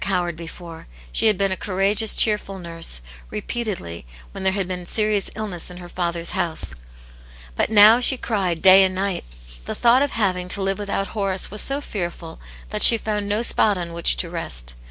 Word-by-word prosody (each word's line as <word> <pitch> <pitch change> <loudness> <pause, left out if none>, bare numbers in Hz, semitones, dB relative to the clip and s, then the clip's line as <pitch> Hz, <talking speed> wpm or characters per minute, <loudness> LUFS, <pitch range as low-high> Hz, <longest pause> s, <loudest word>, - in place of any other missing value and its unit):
i;it - - -4
yane's 195 - +1
Hero 175 -1 -1
before; 165 0 -11 0.2
she - - +2
had 210 -3 +3
been 195 0 0
a - - 0
courageous, 200 +3 +2
cheerful 210 -3 +1
nurse> 165 - -4 0.3
repeatedly, 105 - -5 0.2
when - - -7
there 190 - +2
had 195 -2 -2
been 180 -1 -6
serious 210 -1 +1
illness 200 -6 -5
in 180 - -11
her 175 -1 -10
father's 170 -1 -3
house. 160 - -3 0.8
But - - 0
now 220 +2 +7
she 255 +1 +4
cried 190 -9 -2
day 190 0 +8
and 185 -1 0
night. 195 -1 -2 0.4
The - - -5
thought 240 +2 +3
of 285 - -1
having 185 -5 -1
to 195 - -3
live 195 +1 -2
without 200 -1 -3
Horace 195 -4 -2
was 210 - 0
so 275 +1 0
fearful 175 - -6 0.3
that 210 -1 -4
she 230 - +9
found 210 -2 -4
no 210 +3 0
spot 210 -3 +1
on 175 -1 -5
whi(di 170 0 +3
to 170 - -1
rest. - - -4
190 Hz, 195 wpm, -21 LUFS, 175-210 Hz, 0.8 s, she